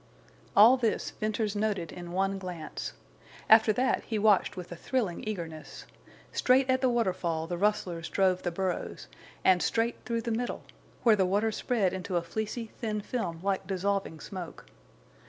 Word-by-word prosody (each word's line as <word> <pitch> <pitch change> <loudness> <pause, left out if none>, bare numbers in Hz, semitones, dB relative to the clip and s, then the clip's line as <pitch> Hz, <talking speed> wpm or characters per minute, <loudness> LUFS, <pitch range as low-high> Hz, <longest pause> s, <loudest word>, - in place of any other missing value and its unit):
All 230 +6 +8
this 230 -4 0
Venters 215 -1 -2
noted 205 -6 -1
in 175 -1 -8
one 195 +2 0
glance. 175 -4 -6 0.5
After 220 0 +7
that 255 +4 +1
he 220 - -3
watched 205 -3 +3
with 180 -1 -7
a - - -5
thrilling 205 -2 -2
eagerness. 165 -7 -6 0.5
Straight 260 +1 +3
at 260 0 +2
the 260 - +3
waterfall 180 -8 0
the 175 +1 -3
rustlers 180 -5 0
drove 185 -2 +2
the 175 - -1
burros, 185 +1 -3 0.4
and 185 -2 +5
straight 230 +1 0
through 230 -1 -2
the 230 - -3
middle, 240 +2 -2 0.4
where 230 -3 +6
the 190 -3 +2
water 205 +4 +1
spread 210 -3 0
into 185 -1 -2
a 170 - 0
fleecy, 220 +5 -4
thin 215 -2 -2
film 180 -8 -3
like 195 -1 -1
dissolving 195 -3 -1
smoke. 180 0 -8
200 Hz, 160 wpm, -29 LUFS, 180-225 Hz, 0.5 s, All